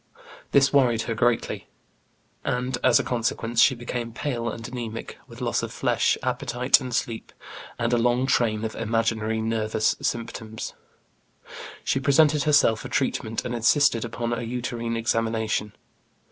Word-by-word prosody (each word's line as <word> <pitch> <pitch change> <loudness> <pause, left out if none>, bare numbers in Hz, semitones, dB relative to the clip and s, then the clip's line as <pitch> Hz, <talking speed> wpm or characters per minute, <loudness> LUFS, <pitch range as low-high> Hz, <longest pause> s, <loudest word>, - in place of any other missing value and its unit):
This 140 0 +4
worried 120 -5 +3
her 115 - -2
greatly, 115 +1 0 0.8
and 125 +1 -1
as - - +5
a - - 0
consequence 115 -1 0
she 130 - +5
became 120 -1 -5
pale 120 -3 -2
and 115 - -7
anæmic, 115 -1 -6
with - - -12
loss - - 0
of - - -5
flesh, - - +1
appetite, 125 +2 +2
and 130 -1 -5
sleep, 115 -1 -3 0.5
and 120 +1 0
a 120 - +3
long 120 +2 +2
train 115 -4 +1
of 110 - -4
imaginary 110 -1 0
nervous 110 -1 0
symptoms. 110 -1 -4 1.1
She - - +1
presented 145 +2 +4
herself 145 -7 +4
for - - -7
treatment, 115 -4 -1
and 120 - -3
insisted 120 +1 +3
upon 120 0 -3
a 120 - -2
uterine 120 -1 -3
examination. 110 -2 0
115 Hz, 145 wpm, -25 LUFS, 115-125 Hz, 1.1 s, as